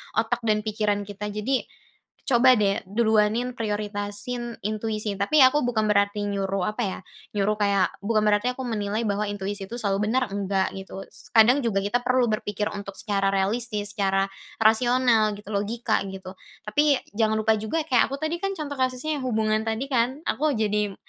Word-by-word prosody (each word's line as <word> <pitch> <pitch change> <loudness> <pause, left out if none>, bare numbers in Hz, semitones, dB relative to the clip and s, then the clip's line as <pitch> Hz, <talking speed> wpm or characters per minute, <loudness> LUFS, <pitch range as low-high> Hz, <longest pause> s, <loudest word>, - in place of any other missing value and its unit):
otak 230 +2 +1
dan 215 -1 +2
pikiran 210 -1 -1
kita. 205 +1 -6
Jadi, 215 +6 -1 0.6
coba 255 0 +5
deh 200 -2 +1
duluanin, 220 +3 +2
prioritasin 210 +2 -3
intuisi. 215 0 -2
Tapi 265 +8 +5
aku 260 +3 +5
bukan 220 -3 +1
berarti 205 0 +1
nyuruh 195 -2 -1
apa 215 - -15
ya, 190 - -3 0.4
nyuruh 210 +1 +1
kayak 200 -2 +2
bukan 215 +1 +1
berarti 210 +4 +2
aku 260 - -5
menilai 215 -1 -2
bahwa 205 0 -1
intuisi 200 -1 -4
itu 235 - -7
selalu 205 -2 0
benar, 255 -2 0
enggak 195 -1 0
gitu. 195 0 -8
S - - -11
kadang 240 +5 +6
juga 205 -6 0
kita 240 +5 +1
perlu 250 -2 +1
berpikir 210 -1 -2
untuk 200 -1 -7
secara 200 -2 -1
realistis, 205 +1 -1
secara 195 -1 +1 0.3
rasional 225 -1 +3
gitu, 205 +1 -11
logika 220 +3 0
gitu. 190 -1 -8 0.3
Tapi, 285 +7 +3 0.2
jangan 220 0 +1
lupa 220 0 +2
juga, 300 +9 -1
kayak 255 -6 +3
aku 275 - -4
tadi 335 +2 -1
kan 390 0 -2
contoh 285 -4 -5
kasusnya 260 +4 -1
yang 260 - -6
hubungan 215 -2 +1
tadi 225 +4 -1
kan, 260 +5 0
aku 300 -4 0
jadi, 210 -2 0
215 Hz, 170 wpm, -25 LUFS, 205-245 Hz, 0.6 s, kadang